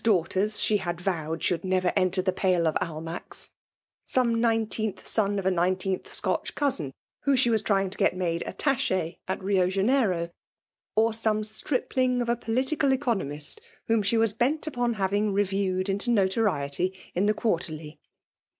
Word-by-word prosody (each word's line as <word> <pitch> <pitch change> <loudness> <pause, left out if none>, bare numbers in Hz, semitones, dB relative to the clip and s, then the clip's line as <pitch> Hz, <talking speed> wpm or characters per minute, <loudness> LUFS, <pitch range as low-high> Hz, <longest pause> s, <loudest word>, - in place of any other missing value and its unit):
271 220 -4 +5 0.2
daughters 210 +1 -1
she 210 -1 +2
bad 175 -2 -3
vowed 165 -4 -2
should 175 - +1
never 185 -1 +1
entar 185 0 +2
the 185 - +2
pale 185 -3 +2
of 155 - +1
Ahnack*s; 165 +1 -5 0.6
some 235 -3 +2
nineteenth 225 -2 0
son 205 -2 +1
of 195 - -3
a 190 - +3
nineteenth 185 +1 0
Scotch - - -2
cousin, 225 - 0 0.3
whom 280 -1 +2
she 245 -2 +4
was 220 -2 +2
^^^S 195 -2 +1
^^ - - -5
S^^ - - +2
made 170 -2 -1
attache 245 - 0
at 190 +1 -3
Rio 190 -2 +2
Janeiro; 195 -4 +1 0.6
or 225 +1 +3
some 220 -1 +1
stripling 250 +3 0
of 240 -1 -1
a 235 - +3
political 260 +5 0
economist, 220 - -1 0.2
whom 225 -1 +2
ahe 205 +3 +1
was 225 -2 +3
bent 260 +8 +1
upon 245 -6 -1
having 205 +1 0
reviewed 195 -1 0
into 200 +5 +2
noto 200 -2 +2
riety 175 +1 0 0.2
in 190 +4 +1
the 215 - +2
Quarterly. 160 -7 -2
200 Hz, 165 wpm, -27 LUFS, 185-230 Hz, 0.6 s, 271